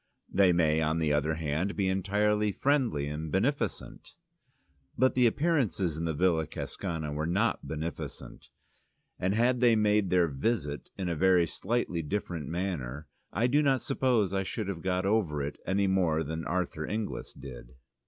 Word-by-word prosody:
They 95 -1 +5
may 80 -2 +2
on 80 +1 +1
the 80 -2 +1
other 75 +2 +1
hand 80 +5 -2
be 100 -2 0
entirely 105 +3 +1
friendly 125 - +1
and 75 +1 -5
beneficent. 130 +10 -2 0.8
But 130 +1 +3
the 125 -2 +4
appearances 120 - +1
in 80 +2 -3
the 80 -2 -1
Villa 80 -2 +2
Cascana 80 -3 -4
were 75 +2 -2
not 100 +7 0
beneficent, 80 +2 -6 0.7
and 95 +3 0
had 120 +2 +2
they 120 -2 +5
made 105 -2 +2
their 90 -1 +3
"visit" 75 - -2
in 95 -2 -3
a 85 - -1
very 90 +1 +4
slightly 95 -1 -2
different 85 -2 -3
manner, 80 -6 -3 0.3
I 115 - +1
do 140 +5 +3
not 135 -3 +2
suppose 125 - +1
I 95 - +1
should 105 +2 -4
have 90 -4 -4
got 95 +1 0
over 95 -9 +1
it 70 - -5
any 100 +1 +2
more 90 -5 +2
than 80 +2 -4
Arthur 85 -3 -2
Inglis 110 0 -4
did. 65 -2 -11
90 Hz, 165 wpm, -29 LUFS, 80-105 Hz, 0.8 s, They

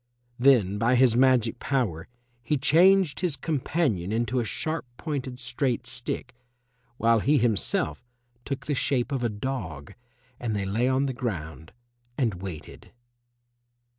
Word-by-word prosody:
Then 115 -7 +4
by 120 +3 +3
his 125 -2 +4
magic 125 -3 +3
power 105 - -1 0.3
he 135 +5 0
changed 175 +1 +4
his 175 -6 0
companion 135 - -1
into 120 +3 0
a - - 0
sharp 155 +6 -3
pointed 135 -5 -4
straight 125 0 -2
stick, 125 +1 -4 0.6
while 115 0 +3
he 145 +7 +3
himself 105 - 0 0.4
took 140 -1 -5
the 150 - -1
shape 135 -1 0
of 135 -3 -1
a 120 - +1
dog, 105 - -5 0.5
and 115 -3 -2
they 100 -1 -1
lay 110 +6 0
on 130 +1 +2
the 135 - -2
ground 80 - -5 0.5
and 110 -9 -1
waited. 90 -6 -9
125 Hz, 135 wpm, -26 LUFS, 105-135 Hz, 0.6 s, Then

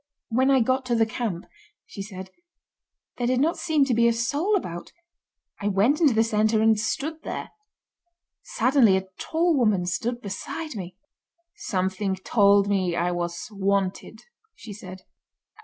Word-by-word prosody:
"When 255 +4 +2
I 265 -2 +4
got 260 +3 +1
to 240 - +1
the 225 -1 +3
camp," 220 -6 -4 0.4
she 200 - -9
said, 190 -2 -8 0.9
"there 240 - 0
did 250 0 +1
not 315 +5 +2
seem 310 -4 +2
to 260 - 0
be 235 +1 +4
a 235 - +3
soul 285 - 0
about, 175 - -4 0.7
I 205 - -1
went 205 - +2
into 285 -8 +4
the 225 - +4
centre 220 0 +1
and 220 -1 +3
stood 310 +8 -3
there. - - -6 0.9
Suddenly 260 - +3
a 190 0 -5
tall 330 +1 +1
woman 215 -9 +2
stood 230 +8 -2
beside 250 +9 -6
me. 185 -3 -7 0.6
'Something 190 0 -2
told 200 +1 +3
me 185 -4 0
I 175 +1 0
was 175 +1 -4
wanted!' 195 -1 -2 0.3
she 215 - -10
said. 185 -2 -10
215 Hz, 155 wpm, -25 LUFS, 190-255 Hz, 0.9 s, I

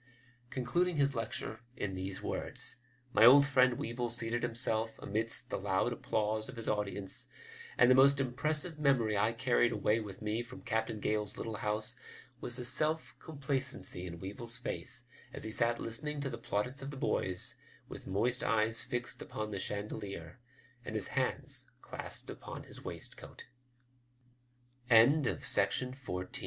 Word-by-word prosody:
'* 125 0 -31
Concluding 170 +9 +1
his 140 -1 +3
lecture 110 -1 -3 0.2
in 100 -2 -2
these 95 0 -4
words, - - -2 0.4
my 110 - +6
old 140 +4 +10
friend 130 -3 +5
Weevil 120 +1 -2
seated 120 0 -2
himself 115 -2 -1
amidst 110 +3 -1
the - - -1
loud - - +1
applause 110 +1 -1
of 130 - -7
his 115 - -3
audience, 100 -2 -1 0.5
and 125 - +7
the 130 - +8
most 140 +2 +7
impressive 150 +5 0
memory 125 -7 +3
I 105 +3 +3
carried 120 0 +3
away 105 +1 +2
with 100 -4 -7
me 110 +1 -1
from 120 +2 -10
Captain 110 -1 -1
Gale's 105 0 0
little 110 -2 -3
house 105 +3 0 0.4
was 120 - -3
the 125 0 -3
self 155 +5 +2
complacency 135 - -2
in 85 -1 -7
Weevil's 115 +6 -5
face 125 0 -3 0.3
as - - -4
he 110 - -4
sat 115 +1 +2
listening 145 +6 -2
to 135 -2 -2
the 115 - -5
plaudits 120 +5 -2
of 135 - -5
the 140 - -7
boys, 95 -7 -1 0.3
with - - -9
moist 120 +7 +1
eyes 110 +1 +2
fixed 125 -1 -3
upon 110 0 -4
the 100 - -2
chandelier, 100 -3 -4 0.4
and 110 - -5
his 105 - -1
hands 130 0 -1
clasped - - -5
upon - - -8
his - - -10
waistcoat* - - -7 1.4
OL 125 +6 +7
115 Hz, 150 wpm, -34 LUFS, 105-130 Hz, 1.4 s, old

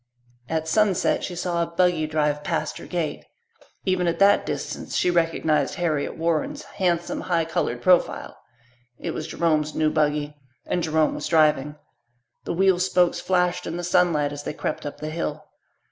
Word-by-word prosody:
At 160 0 -1
sunset 200 +2 +2
she 180 - -4
saw 175 -1 -1
a 170 - 0
buggy 170 -2 +1
drive 150 -1 0
past 155 -3 -2
her - - -10
gate. 165 -5 -3 0.6
Even 185 -2 +1
at 170 - 0
that 200 +1 +4
distance - - -4
she 180 - +2
recognized 165 -2 +1
Harriet 165 -6 -1
Warren's 170 - -1
handsome, 175 -3 -1
high 170 -3 0
coloured 125 -6 -2
profile. 180 -1 +2 0.6
It - - -4
was 155 - -5
Jerome's 155 -2 0
new 155 -1 +2
buggy 150 -1 0 0.3
and 175 - -1
Jerome 160 -1 +2
was - - -4
driving. 150 -3 +3 0.7
The - - -2
wheel 190 0 +3
spokes 180 -1 +2
flashed 180 -1 0
in 165 - -4
the 175 - -4
sunlight 170 -5 +2
as 145 - -6
they 145 - -5
crept 150 - -4
up 145 - -8
the 155 0 -4
hill. 165 +1 -4
165 Hz, 165 wpm, -24 LUFS, 155-180 Hz, 0.7 s, that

